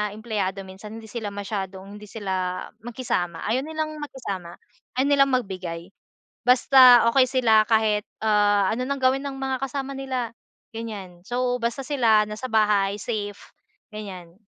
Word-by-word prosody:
empleyado 205 -4 -2
minsan, 195 +3 -10
hindi 225 -1 -10
sila 225 -4 -4
masyadong 195 -1 -5
hindi 210 - -12
sila 185 -3 -3 0.2
makisama, 235 -8 -3
ayaw 245 +3 +2
nilang 310 -1 -3
makisama. 195 -12 -6 0.4
Ayaw 265 +2 +3
nilang 275 -1 +5
magbigay. 185 -6 -4 0.6
Basta 250 -1 +7
okey 265 -2 +6
sila 230 -4 +4
kahit, 215 -2 +2 0.2
ah, 205 -2 +3
ano 250 +2 -2
ng 280 -1 -2
gawin 260 +2 +2
ng 275 -1 -5
mga 265 -1 -2
kasama 275 +1 -3
nila, 255 -4 -3 0.4
ganyan 200 -6 -7
so 250 0 0
basta 235 +4 -1
sila 230 -7 +4
nasa 210 +4 -6
bahay 205 -2 +3
safe, 205 -3 -4 0.5
ganyan. 185 -5 -8
220 Hz, 140 wpm, -24 LUFS, 195-255 Hz, 0.6 s, Basta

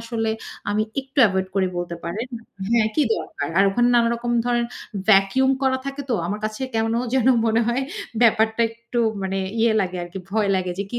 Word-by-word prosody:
আসলে 225 -1 -2 0.4
আমি 210 +1 +1 0.2
একটু 270 +2 -8
এভয়েড 190 -1 -1
করি 195 -1 +2
বলতে 175 -1 -4
পারেন। 200 +8 -3 0.4
হ্যাঁ, 230 -2 +3
কি 305 - +3
দরকার। 150 -3 -5
আর 195 - +6
ওখানে 240 +5 +2
নানারকম 235 0 +1 0.2
ধরনের 240 -1 +1 0.4
ভ্যাকুম 215 +6 +4
করা 260 0 +2
থাকে 275 +1 -4
তো। - - +3
আমার 205 +4 -3
কাছে 215 +4 -3
কেন 225 +1 +1 0.2
যেন 260 -1 +3 0.2
মনে 225 +1 +3
হয় 245 +3 0 0.4
ব্যাপারটা 220 0 +3
একটু 235 +1 -6 0.2
মানে 190 0 -2 0.2
ইয়ে 230 -1 +4
লাগে 185 -2 -2
আরকি 175 +2 -8
ভয় 215 -1 +1
লাগে 185 -1 -2
যে 200 - -1
কি 240 - -1
225 Hz, 185 wpm, -22 LUFS, 195-240 Hz, 0.4 s, আর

